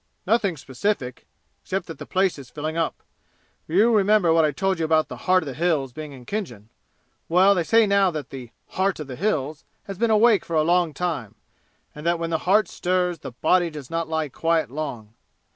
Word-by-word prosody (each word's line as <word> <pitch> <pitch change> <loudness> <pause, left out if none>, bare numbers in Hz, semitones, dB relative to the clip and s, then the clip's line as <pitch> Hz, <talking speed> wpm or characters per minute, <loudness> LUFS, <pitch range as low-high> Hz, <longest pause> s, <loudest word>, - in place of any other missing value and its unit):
"Nothing 200 -4 +1
specific, 130 0 -3 0.3
except 190 -1 -3
that 165 - -9
the - - -8
place 190 -4 +1
is 130 -3 -11
filling 155 +4 -5
up. 165 -1 -2 0.6
You 215 +8 +3
remember 200 -4 +4
what 165 -1 +4
I 155 - +3
told 190 +5 -1
you 160 - 0
about 155 0 +2
the - - -6
'Heart 185 -1 +5
of - - -9
the - - -5
Hills' 150 -5 0
being 155 +2 -7
in 130 -3 -12
Khinjan? 120 - -5 0.6
Well, 185 +4 +5
they 180 -3 0
say 225 +6 +4
now 200 -1 +3
that 150 -6 -6
the 130 -3 -8 0.2
'Heart 190 -1 -1
of - - -5
the 130 -2 -8
Hills' 155 -5 -2 0.2
has 195 -1 -8
been 235 0 +2
awake 220 -1 +4
for 170 - -4
a 155 - +4
long 170 -2 +2
time, 155 - -3 0.6
and 150 - -10
that 170 +1 +1
when 165 0 -4
the 160 - 0
heart 205 0 +4
stirs 180 -1 -1
the 130 - -8
body 170 +7 +2
does 150 -4 -10
not 165 -1 -2
lie 160 -1 -1
quiet 160 -1 0
long. 120 -8 -6
165 Hz, 210 wpm, -23 LUFS, 150-190 Hz, 0.6 s, Heart